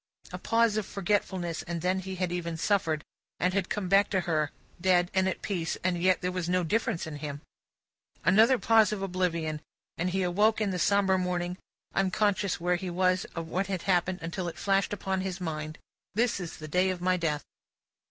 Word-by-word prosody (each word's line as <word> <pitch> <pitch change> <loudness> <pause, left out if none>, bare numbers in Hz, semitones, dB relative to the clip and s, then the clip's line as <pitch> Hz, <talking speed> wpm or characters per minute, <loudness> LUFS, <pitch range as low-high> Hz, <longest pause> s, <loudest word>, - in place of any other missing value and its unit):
A - - -4
pause 230 -2 +2
of 215 - -1
forgetfulness, 190 -4 -1
and 170 -1 -5
then 185 +1 +1
he 190 0 -5
had 180 -1 -1
even 170 -2 -3
suffered, 160 -5 +1 0.4
and 180 +1 +1
had 195 -2 0
come 205 -3 -2
back 195 +2 +4
to 190 - +1
her, 155 -4 0 0.3
dead 180 -1 +3
and 190 0 +2
at - - -5
peace, 170 -5 -2
and 175 -1 0
yet 185 0 +3
there 180 0 -1
was 180 -2 -3
no 180 0 +2
difference 210 +1 0
in 155 -2 -6
him. 145 -1 -6 0.8
Another 225 +7 +6
pause 225 -2 +4
of 200 -2 -3
oblivion, 170 -5 -1 0.4
and 180 +2 +1
he 190 +1 0
awoke 205 +5 +3
in 210 -3 0
the 180 - -2
sombre 195 0 +3
morning, 180 -1 -1 0.4
unconscious 195 0 +1
where 180 +1 +1
he 185 +1 -5
was 185 +1 +1
or 165 - -2
what 180 +4 -2
had 190 -3 -3
happened, 180 -1 +1
until 175 +2 -3
it 170 0 -6
flashed 195 +2 +1
upon 190 -2 -2
his 190 -1 -4
mind, 155 -3 -4 0.4
"this 230 -1 +2
is 175 -3 -6
the 155 - -8
day 180 +4 +2
of 185 -1 -2
my 185 +1 +2
death!" 155 -4 -1
185 Hz, 200 wpm, -29 LUFS, 170-195 Hz, 0.8 s, Another